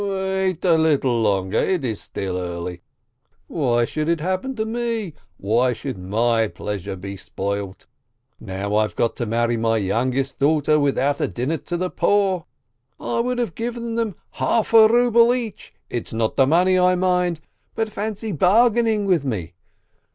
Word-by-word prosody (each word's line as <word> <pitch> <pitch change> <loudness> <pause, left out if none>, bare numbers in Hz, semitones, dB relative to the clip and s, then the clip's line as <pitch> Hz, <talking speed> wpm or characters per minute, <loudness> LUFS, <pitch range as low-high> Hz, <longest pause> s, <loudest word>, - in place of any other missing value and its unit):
"Wait 190 -2 -1
a 165 -3 +4
little 135 -7 +2
longer. 100 -3 +1
It 180 -8 0
is 110 -4 -3
still 95 -2 -4
early. 90 -1 -5 0.6
Why 120 -7 +1
should 155 +5 -3
it 170 -1 +1
happen 185 +10 -2
to 220 -2 -2
me, 225 -5 -3 0.2
why 120 +5 +1
should 125 -3 -6
my 115 +4 +1
pleasure 100 -2 -5
be 100 +2 -7
spoilt? 100 +1 -5 0.5
Now 100 0 -4
I've 105 -4 0
got 115 - 0
to 120 - -2
marry 120 +1 +1
my 115 0 +1
youngest 125 +7 -1
daughter 150 +1 +3
without 140 0 +1
a - - +1
dinner 130 +7 -2
to 175 +4 -4
the 185 +1 -2
poor! 195 -4 +1 0.5
I - - -2
would 250 +1 0
have 235 -8 -1
given 235 +1 -4
them 225 -5 -1 0.2
half 230 0 0
a 220 -1 +9
ruble 235 +1 +4
each, 230 -5 -6 0.2
it's 120 -2 -5
not 110 -1 -1
the 135 - +4
money 180 +4 +3
I 180 0 +4
mind, 180 -2 +1 0.4
but 220 -1 -2
fancy 215 +1 -4
bargaining 220 - +3
with 180 -6 +2
me! 95 - -4
155 Hz, 160 wpm, -22 LUFS, -, 0.6 s, a